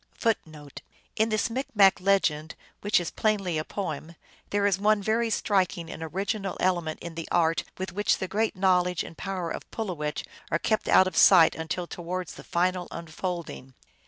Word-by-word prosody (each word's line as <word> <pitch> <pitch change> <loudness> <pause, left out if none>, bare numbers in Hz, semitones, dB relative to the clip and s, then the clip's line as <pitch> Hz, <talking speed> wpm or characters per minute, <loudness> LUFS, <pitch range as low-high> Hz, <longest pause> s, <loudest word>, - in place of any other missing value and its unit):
1 225 -2 +5
1 150 -2 -12 0.5
In 220 +1 +2
this 215 -1 +1
Micmac 225 -7 +3
legend, 165 -5 +1 0.3
which 205 -2 +3
is 175 - -4
plainly 195 -7 0
a - - -2
poem, 165 -3 -5 0.3
there 205 0 +1
is 195 -2 +2
one 210 +1 +3
very 225 +3 0
striking 185 -5 0
and - - -8
original 195 +5 -3
element 175 -4 0
in 170 -1 -7
the 165 0 -6
art 165 -1 +2
with 185 0 -5
which 205 +2 +2
the 190 - -3
great 215 +4 0
knowledge 180 -2 +2
and - - -10
power 185 -3 -4
of - - -4
Pulowech 165 -9 -4 0.2
are 165 - +2
kept 215 +5 -1
out 190 - +7
of 185 - -4
sight 170 -4 +7
until 160 +2 -4
towards 180 0 -5
the - - -11
final 180 +1 0
unfolding. 165 -5 -6
185 Hz, 175 wpm, -27 LUFS, 165-200 Hz, 0.5 s, out